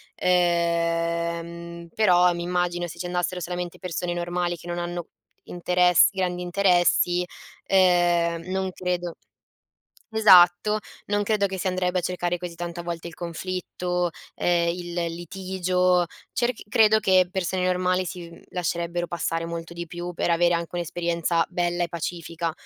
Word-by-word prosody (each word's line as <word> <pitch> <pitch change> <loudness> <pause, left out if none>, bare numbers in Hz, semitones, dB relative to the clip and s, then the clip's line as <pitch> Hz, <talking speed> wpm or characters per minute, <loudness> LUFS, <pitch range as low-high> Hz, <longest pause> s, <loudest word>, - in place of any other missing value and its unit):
ehm, 170 -1 0
però 180 -4 +5
mi 170 0 -4
immagino 175 0 -1
se 170 - -10
ci - - -4
andassero 180 +1 -1
solamente 175 0 -4
persone 180 -1 -3
normali, 175 0 -2
che 170 - -13
non 175 0 -3
hanno 175 -1 -4 0.4
interess 180 -1 +4
grandi 180 -2 -2
interessi, 180 -1 +2 0.4
ehm, 175 -3 +3
non 190 0 -1
credo 180 -2 -3 1.0
esatto, 190 0 +6 0.3
non 205 0 +1
credo 205 -1 +1
che 190 0 -5
si 190 - -1
andrebbe 185 0 0
a - - -3
cercare 175 0 -1
così 175 -1 -6
tanta 175 0 -5
volte 170 -1 -5
il 165 - -10
conflitto, 180 +1 -3 0.3
ehm, 170 -1 +2
il 175 0 -4 0.2
litigio, 180 0 0 0.3
cerc 240 -1 -1
credo 220 -1 +5
che 185 -3 +4
persone 185 0 -1
normali 185 0 +1
si 175 -1 -6
mhmm, - - -14
lascerebbero 175 0 -2
passare 165 -1 -2
molto 170 0 -6
di 170 0 -5
più, 175 +2 -6
per 175 - -1
avere 175 +1 +3
anche 170 0 -3
un'esperienza 170 0 0
bella 175 -1 0
e - - -1
pacifica, 170 0 -4
175 Hz, 145 wpm, -25 LUFS, 170-180 Hz, 1.0 s, esatto